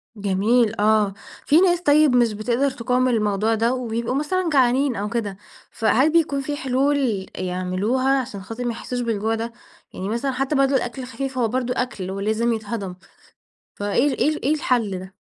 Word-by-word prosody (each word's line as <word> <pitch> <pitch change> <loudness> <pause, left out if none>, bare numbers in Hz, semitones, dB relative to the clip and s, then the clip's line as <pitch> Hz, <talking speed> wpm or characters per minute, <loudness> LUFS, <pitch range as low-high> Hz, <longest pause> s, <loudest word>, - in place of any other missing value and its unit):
جميل 210 +3 +2
آه، 210 -1 +3 0.3
في 310 +4 +5
ناس 350 -2 +3
طيّب 295 -4 +4
مش 240 -3 +3
بتقدر 240 +6 0
تقاوم 250 +1 0
الموضوع 215 -2 +1
ده 230 +3 +1
وبيبقوا 235 -1 -2
مثلًا 345 +5 0
جعانين 260 0 +3
أو 205 0 -3
كده، 210 -4 -3 0.3
فهل 250 +7 +2
بيكون 300 -4 +2
في 290 +2 -3
حلول 265 -6 0
يعملوها 190 +9 0
عشان 205 -5 -8
خاطر 225 +5 -6
ما 240 - 0
يحسّوش 245 +2 -5
بالجوع 225 -1 -1
ده، 230 +1 -4 0.4
يعني 190 +2 -5
مثلًا 235 +5 -1
حتّى 270 +3 -1
برضه 275 0 +3
الأكل 245 +1 -2
الخفيف 265 +1 -5
هو 240 -2 +2
برضه 250 +2 -1
أكْل 200 -7 -3
ولازم 220 +4 0
يتهضَم، 210 -4 -4 0.8
فإيه 205 +7 +1
ال - - -5
إيه - - +3
ال 310 - -4
إيه 290 - +3
الحَلّ 245 - 0
ده، 185 +1 -11
240 Hz, 175 wpm, -22 LUFS, 215-270 Hz, 0.8 s, في